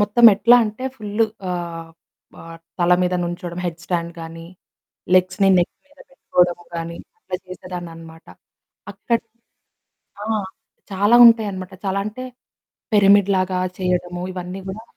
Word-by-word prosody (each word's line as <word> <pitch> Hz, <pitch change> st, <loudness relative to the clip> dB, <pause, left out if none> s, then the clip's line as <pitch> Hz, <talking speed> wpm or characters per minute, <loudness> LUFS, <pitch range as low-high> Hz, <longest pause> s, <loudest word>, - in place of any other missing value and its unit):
మొత్తం 210 Hz, +3 st, +5 dB
ఎట్లా 240 Hz, +4 st, +5 dB
అంటే, 220 Hz, +5 st, -6 dB
ఫుల్లు 215 Hz, +1 st, 0 dB, 0.3 s
ఆహ్, 170 Hz, -2 st, -5 dB, 0.5 s
ఆహ్, 165 Hz, 0 st, -11 dB, 0.2 s
తల 175 Hz, 0 st, +3 dB
మీద 180 Hz, 0 st, 0 dB
నించోవడం 175 Hz, 0 st, -5 dB
హెడ్స్ 170 Hz, 0 st, -6 dB
స్టాండ్ 170 Hz, -1 st, -2 dB
కానీ, 165 Hz, 0 st, -9 dB, 0.7 s
లెగ్స్‌ని 185 Hz, +2 st, +3 dB
నెక్ 175 Hz, -, 0 dB
మీద 285 Hz, 0 st, -27 dB
పెట్టుకోవడం 180 Hz, -9 st, +1 dB, 0.2 s
కానీ, 170 Hz, 0 st, -5 dB, 0.2 s
అట్లా 180 Hz, -, -5 dB
చేసేదాన్ని 180 Hz, -1 st, -8 dB
అన్నమాట. 165 Hz, 0 st, -13 dB, 0.7 s
అక్కడ, 230 Hz, +4 st, -1 dB, 1.0 s
ఆ! -, -, -5 dB, 0.7 s
చాలా 205 Hz, +4 st, +3 dB
ఉంటాయన్నమాట. 200 Hz, -5 st, +3 dB
చాలా 195 Hz, +1 st, 0 dB
అంటే 215 Hz, +5 st, -6 dB, 0.7 s
పిరమిడ్ 200 Hz, -1 st, +5 dB
లాగా 185 Hz, 0 st, 0 dB, 0.2 s
చేయడము 180 Hz, -1 st, -2 dB
ఇవన్నీ 180 Hz, +1 st, -6 dB
కూడా 200 Hz, +4 st, -6 dB
185 Hz, 125 wpm, -21 LUFS, 175-205 Hz, 1.0 s, మొత్తం